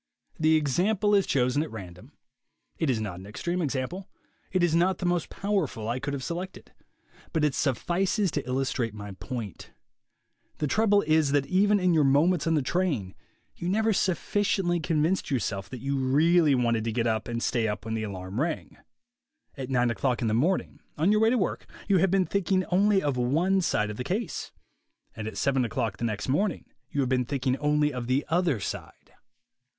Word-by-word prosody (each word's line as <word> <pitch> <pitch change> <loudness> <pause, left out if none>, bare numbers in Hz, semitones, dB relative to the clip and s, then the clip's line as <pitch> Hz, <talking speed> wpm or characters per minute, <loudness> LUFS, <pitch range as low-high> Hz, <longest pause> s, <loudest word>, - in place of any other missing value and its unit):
The 160 0 +4
example 185 +8 +1
is 200 -2 +4
chosen 130 +2 +2
at 155 - -3
random. 90 -5 -10 0.7
It 160 - +1
is 120 -4 +1
not 100 -5 -4
an 95 - -11
extreme 175 +12 -3
example. 155 +6 -3 0.4
It 185 -1 +1
is 170 -2 +2
not 180 +3 +3
the 180 - -4
most 175 -2 0
powerful 190 - -2
I 120 +3 -1
could 145 +2 -3
have 135 - -5
selected. 180 +5 -6 0.6
But 160 -2 +1
it 150 - +1
suffices 180 - 0
to 145 -4 -3
illustrate 125 -3 -1
my 105 -1 -7
point. 110 - -7 0.9
The 150 - -1
trouble 205 +5 +3
is 155 -2 +2
that 145 -1 +2
even 200 +6 +3
in 180 -2 +2
your 155 -2 +4
moments 150 +5 +3
on 165 - +3
the 150 - +1
train 140 - -1 0.4
you 175 - -4
never 220 +3 +2
sufficiently 185 -1 0
con 155 -1 0
vinced 185 +4 0
yourself 100 -7 -2
that 125 - -8
you 140 +1 -1
really 150 +3 +4
wanted 115 -3 +1
to 115 - -1
get 115 +1 0
up 110 -2 0
and 115 0 -3
stay 115 -2 +1
up 105 +1 -4
when 110 - -3
the 110 - -1
alarm 100 +1 -4
rang. 165 0 -3 0.8
At 135 -2 -6
nine 125 -2 +2
o'clock 125 +1 0
in - - +1
the 110 - +1
morning, 160 +12 0 0.2
on 165 +7 +3
your 215 0 +3
way 225 - +5
to 250 - +2
work, 190 - -2 0.2
you 195 -3 +4
have 190 +2 +3
been 190 0 +2
thinking 190 -1 0
only 195 +1 +3
of 140 -3 0
one 165 +10 +2
side 105 -11 0
of 105 - -8
the 125 - -3
case; 190 - -3 0.6
and 110 -1 -5
at 110 - -6
seven 135 -2 +2
o'clock 110 -3 -2
the 120 - -2
next 105 -3 -3
morning 180 +7 0 0.2
you 145 - -1
have 130 - 0
been 125 -1 +1
thinking 130 -1 0
only 150 0 +1
of 125 -2 -4
the 130 +3 +1
other 165 - +1
side. - - -7
145 Hz, 195 wpm, -27 LUFS, 120-180 Hz, 0.9 s, way